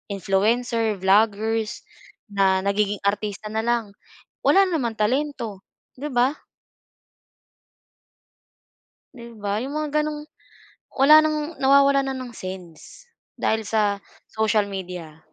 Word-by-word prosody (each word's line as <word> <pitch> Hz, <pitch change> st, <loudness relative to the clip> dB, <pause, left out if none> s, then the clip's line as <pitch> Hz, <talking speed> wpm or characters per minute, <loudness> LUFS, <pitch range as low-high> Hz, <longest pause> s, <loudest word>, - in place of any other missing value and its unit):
influencer, 220 Hz, +4 st, +1 dB
vloggers 215 Hz, +3 st, +1 dB, 0.5 s
na 190 Hz, -1 st, +2 dB
nagiging 200 Hz, 0 st, 0 dB
artista 210 Hz, +1 st, -2 dB
nalang, 225 Hz, -1 st, -1 dB, 0.6 s
wala 390 Hz, -, +6 dB
naman 280 Hz, -, -1 dB
talento, 230 Hz, -3 st, -2 dB, 0.3 s
'di 290 Hz, -, -4 dB
ba? 255 Hz, -1 st, +2 dB, 2.8 s
Di 235 Hz, -2 st, -11 dB
ba, 205 Hz, +1 st, -2 dB
yung 275 Hz, +3 st, -5 dB
mga 305 Hz, 0 st, 0 dB
gano'ng 300 Hz, 0 st, -5 dB, 0.6 s
wala 300 Hz, +3 st, +6 dB
ng 310 Hz, +1 st, -2 dB
nawawalan 275 Hz, 0 st, +4 dB
na -, -, -3 dB
ng 255 Hz, -2 st, -8 dB
sense 185 Hz, -, -10 dB, 0.3 s
dahil 220 Hz, 0 st, 0 dB
sa 205 Hz, -2 st, 0 dB, 0.2 s
social 220 Hz, -1 st, +1 dB
media. 180 Hz, -5 st, -7 dB
220 Hz, 100 wpm, -23 LUFS, 200-270 Hz, 2.8 s, wala